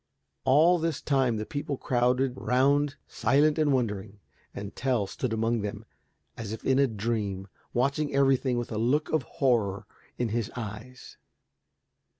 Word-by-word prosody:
All 160 Hz, +7 st, +5 dB
this 165 Hz, 0 st, -1 dB
time 130 Hz, -5 st, +1 dB
the 110 Hz, -, -3 dB
people 145 Hz, +1 st, -4 dB
crowded 125 Hz, +1 st, +1 dB
round 140 Hz, +3 st, +2 dB
silent 150 Hz, +3 st, +2 dB
and 150 Hz, -2 st, +3 dB
wondering, 105 Hz, -5 st, -2 dB, 0.3 s
and 100 Hz, 0 st, -7 dB
Tell 125 Hz, -5 st, 0 dB
stood 125 Hz, +5 st, -4 dB
among 115 Hz, +1 st, 0 dB
them 100 Hz, 0 st, -5 dB, 0.5 s
as 110 Hz, -3 st, -6 dB
if 110 Hz, -, -7 dB
in 135 Hz, 0 st, +3 dB
a 140 Hz, -, +5 dB
dream, 105 Hz, -4 st, -3 dB, 0.2 s
watching 140 Hz, +4 st, 0 dB
everything 135 Hz, -2 st, +2 dB
with 120 Hz, 0 st, -3 dB
a 110 Hz, -, -2 dB
look 140 Hz, +6 st, +1 dB
of 155 Hz, -, +2 dB
horror 115 Hz, -7 st, 0 dB, 0.3 s
in 120 Hz, -2 st, -1 dB
his 115 Hz, 0 st, -1 dB
eyes. 115 Hz, +2 st, -8 dB
125 Hz, 150 wpm, -28 LUFS, 110-140 Hz, 0.5 s, All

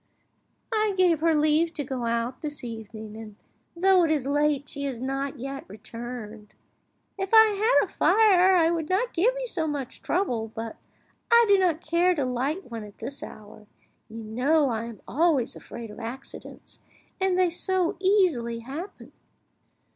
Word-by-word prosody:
"I 430 Hz, -2 st, +1 dB
gave 355 Hz, -4 st, +4 dB
her 325 Hz, 0 st, +3 dB
leave 310 Hz, +2 st, +2 dB
to 290 Hz, -, -2 dB
go 255 Hz, -3 st, -4 dB
out 235 Hz, +2 st, -2 dB
this 300 Hz, -2 st, -6 dB
evening, 220 Hz, -2 st, -8 dB
and 215 Hz, -2 st, -10 dB, 0.4 s
though 370 Hz, +1 st, +4 dB
it 330 Hz, -, +2 dB
is 300 Hz, -4 st, 0 dB
late 290 Hz, 0 st, +1 dB
she 280 Hz, 0 st, -5 dB
has 260 Hz, -4 st, -3 dB
not 270 Hz, +2 st, -3 dB
yet 275 Hz, +2 st, -6 dB
returned. 220 Hz, 0 st, -9 dB, 0.6 s
If 385 Hz, 0 st, -2 dB
I 445 Hz, 0 st, +10 dB
had 430 Hz, +4 st, +3 dB
a -, -, -17 dB
fire, 380 Hz, -4 st, +5 dB
I 330 Hz, -2 st, +4 dB
would 325 Hz, -2 st, -2 dB
not 430 Hz, +7 st, 0 dB
give 390 Hz, +9 st, +3 dB
you -, -, -3 dB
so 330 Hz, -9 st, -2 dB
much 285 Hz, -4 st, -5 dB
trouble, 240 Hz, -, -1 dB
but 225 Hz, 0 st, -5 dB, 0.6 s
I 470 Hz, 0 st, +7 dB
do 400 Hz, -1 st, +5 dB
not 340 Hz, -4 st, +1 dB
care 350 Hz, +3 st, +3 dB
to 285 Hz, -4 st, -1 dB
light 260 Hz, +6 st, -2 dB
one 225 Hz, -2 st, -5 dB
at 205 Hz, -1 st, -13 dB
this 280 Hz, +1 st, -7 dB
hour. 210 Hz, 0 st, -11 dB, 0.4 s
You 225 Hz, +1 st, -8 dB
know 270 Hz, +7 st, +2 dB
I 225 Hz, 0 st, -2 dB
am 230 Hz, -4 st, -10 dB
always 295 Hz, -4 st, +1 dB
afraid 230 Hz, -2 st, -9 dB
of 210 Hz, -, -11 dB
accidents, 240 Hz, +4 st, -9 dB, 0.4 s
and 380 Hz, -1 st, +1 dB
they 365 Hz, -2 st, +3 dB
so 365 Hz, 0 st, 0 dB
easily 345 Hz, -, +2 dB
happen!" 300 Hz, -, -8 dB
290 Hz, 170 wpm, -26 LUFS, 235-360 Hz, 0.6 s, I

